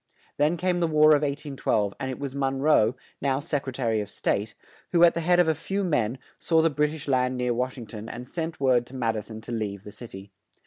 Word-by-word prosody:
Then 150 +4 +2
came 180 0 0
the 170 - +2
War 155 -1 +5
of 150 -1 +6
1812; 140 -8 -1
and 135 -1 -3
it 130 - -4
was 140 -2 -5
Mon 135 -1 -1
roe, 135 -5 +4 0.3
now 135 -1 +1
Sec 145 -2 -2
re - - -2
ta 130 -1 -3
ry 115 - +2
of 105 -1 -4
State, 105 +1 -1 0.4
who, 170 0 +5
at 170 - +7
the 170 - -2
head 175 +2 +3
of 175 - +5
a 160 - +4
few 195 +6 -3
men, 125 - 0 0.2
saw 160 -1 +3
the 165 - +3
Brit 150 +1 +1
ish 150 - -9
land 130 -1 +1
near 125 -1 0
Wash 125 +2 -2
ing 120 - -7
ton 110 +1 -8
and 125 +1 -7
sent 165 +2 -4
word 125 -3 +3
to 135 - -11
Mad 115 -3 0
i - - 0
son 110 +1 -9
to 115 - -9
leave 105 -4 -3
the 105 - -9
cit 120 +2 -11
y. 95 +1 -10
135 Hz, 265 wpm, -26 LUFS, 115-155 Hz, 0.4 s, at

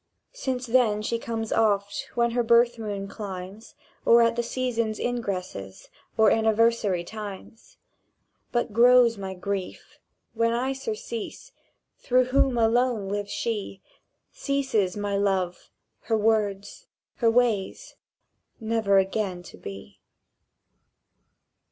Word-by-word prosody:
Since 260 - -3
then 230 -4 +2
she 230 +2 -1
comes 225 -1 -3
Oft 205 -2 0
when 235 -1 +2
her 240 +1 +1
birth 235 0 +3
moon 200 -3 -4
climbs, 200 +1 -8 0.3
Or 235 0 +6
at 230 0 +2
the 240 - 0
seasons' 230 -3 -2
ingresses 185 - -4 0.3
Or 220 -1 +5
anniversary 220 -4 +2
times; 210 +2 -9 0.7
But 240 -3 -1
grows 240 -1 +5
my 190 -1 -5
grief. 195 0 -5 0.3
When 230 0 +1
I 255 +3 0
surcease, 230 -3 -6 0.5
Through 255 +1 +3
whom 270 -2 +3
alone 230 -2 +2
lives 205 0 -3
she, 210 -4 -4 0.5
Ceases 260 -10 -1
my 205 -1 -2
Love, 190 -3 -1 0.4
her 225 - +1
words, 210 -2 -1 0.3
her 230 - +3
ways, 235 - 0 0.6
Never 220 -3 +1
again 190 -2 0
to - - -12
be! 100 0 -10
220 Hz, 115 wpm, -26 LUFS, 200-235 Hz, 0.7 s, Or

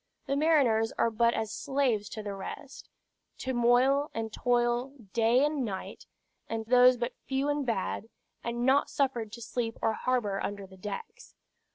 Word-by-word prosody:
The 275 - -1
mariners 275 -8 +3
are 230 - +2
but 235 +2 +2
as 220 -1 -2
slaves 250 -6 0
to 215 - -6
the 205 -1 -4
rest, 195 +8 -8 0.5
to 260 - -3
moil 255 +4 +3
and 225 -1 -3
to - - -8
toil 245 +1 +1 0.2
day 235 +4 +4
and 295 -2 -1
night; 195 -5 -6 0.4
and 225 -1 -3
those 250 +1 +6
but 240 +1 -2
few 270 +2 0
and 290 0 0
bad, 225 0 -2 0.3
and 240 +1 -2
not 270 +2 +4
suffered 245 -6 -1
to 235 - -7
sleep 225 0 -3
or 225 - +1
harbor 220 -5 -1
under 200 -1 -4
the 190 0 -15
decks. 210 - -8
240 Hz, 170 wpm, -29 LUFS, 220-265 Hz, 0.5 s, those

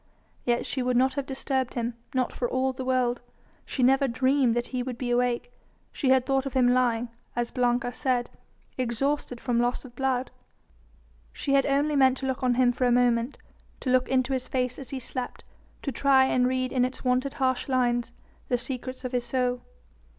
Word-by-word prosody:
Yet 240 0 +1
she 260 - -2
would 250 -1 +1
not 260 +1 +3
have 280 -1 -3
disturbed 265 -1 -2
him, 235 0 -1 0.2
not 255 -2 0
for 245 - -2
all 260 0 0
the 260 - -5
world. 250 -2 +1 0.5
She 260 - -1
never 270 +2 +4
dreamed 255 0 +2
that 240 0 -1
he 255 -1 -2
would 245 -1 -4
be 245 -1 -2
awake; 245 - 0 0.4
she 270 - -1
had 260 -1 +4
thought 270 0 +1
of 275 - -6
him 250 -2 +4
lying 245 -2 +1 0.3
as 240 0 -1
Blanca 245 0 +1
said 250 -2 -1 0.5
exhausted 255 +1 -1
from 240 -2 0
loss 245 +2 0
of 245 -1 -13
blood. 260 -1 -1 1.0
She 275 - -2
had 275 -1 +4
only 285 +2 +2
meant 265 -1 +4
to 270 - -5
look 260 -1 -2
on 250 -1 +2
him 250 -1 +4
for 250 +1 -1
a - - +3
moment, 240 +1 +2 0.4
to 255 - -1
look 255 0 +3
into 260 0 +1
his 255 -1 -2
face 250 -1 -1
as 265 -3 -4
he 270 - -4
slept, 255 0 -4 0.4
to 275 - -2
try 265 +1 +4
and 250 -1 +2
read 255 0 -1
in 255 -2 +2
its 255 +1 -3
wonted 255 +2 +1
harsh 260 -2 0
lines 245 -2 +1 0.4
the 245 - +1
secrets 255 +1 -5
of 250 - -3
his 245 -2 -1
soul. 250 0 0
255 Hz, 200 wpm, -27 LUFS, 245-265 Hz, 1.0 s, never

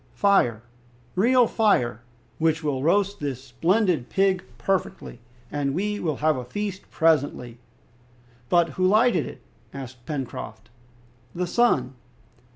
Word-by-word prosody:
"Fire, 125 - +2 0.5
real 245 +6 +4
fire, 125 - +1 0.4
which 160 0 +1
will 140 -3 -1
roast 200 +6 +1
this 135 -4 -4
splendid 165 - +1
pig 190 -2 +1
perfectly, 190 -8 -2 0.3
and 145 -1 -1
we 205 +3 -1
will 155 -4 -1
have 155 -3 +3
a 125 - -4
feast 195 +9 -5
presently!" 145 -7 +1 0.9
"But 170 -1 +3
who 185 +5 0
lighted 215 - +3
it?" - - -10 0.3
asked 130 -3 -9
Pencroft. 120 -6 -6 0.6
"The 180 +1 -1
sun!" 165 - +2
165 Hz, 120 wpm, -24 LUFS, 130-195 Hz, 0.9 s, real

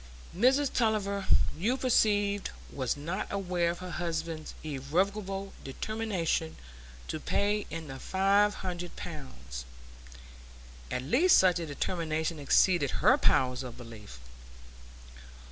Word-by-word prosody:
Mrs 265 +7 +3
Tulliver, 200 -4 0 0.3
you 220 - 0
perceive, 205 -5 +2 0.3
was 130 -1 -1
not 170 +7 -4
aware 180 -3 0
of 170 - -2
her 180 0 -7
husband's 165 -1 -3
irrevocable 195 +7 -2
determination 175 0 -2 0.5
to 155 - -3
pay 205 +5 0
in 165 -1 -6
the 135 -1 -7
five 200 +4 +3
hundred 175 -1 -4
pounds; 130 - -8 1.3
at 125 - -2
least 285 - +5
such 180 -2 +4
a 165 - -4
determination 160 +1 -2
exceeded 145 +1 +3 0.2
her - - +8
powers 125 -1 +2
of 125 -2 -8
belief. 110 - -11
175 Hz, 110 wpm, -30 LUFS, 150-200 Hz, 1.3 s, her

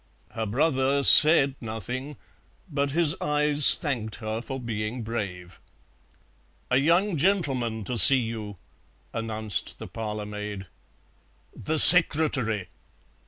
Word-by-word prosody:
Her 110 0 -7
brother 135 +3 -3
said 150 -2 +5
nothing, 125 +6 -9 0.5
but 140 -4 -5
his 160 +1 -1
eyes 150 -1 +3
thanked 120 -8 -7
her 110 0 -8
for 135 +2 -10
being 115 0 -8
brave. 95 -6 -9 1.1
"A 125 - +1
young 170 +6 -1
gentleman 135 - -4
to 120 +4 -6
see 135 - +5
you," 110 -3 -9 0.6
announced 110 -2 -5
the - - -12
parlour 105 -2 -9
maid. 105 -1 -10 0.9
"The 155 +1 -6
secretary!" 145 - +6
125 Hz, 110 wpm, -22 LUFS, 110-145 Hz, 1.1 s, secretary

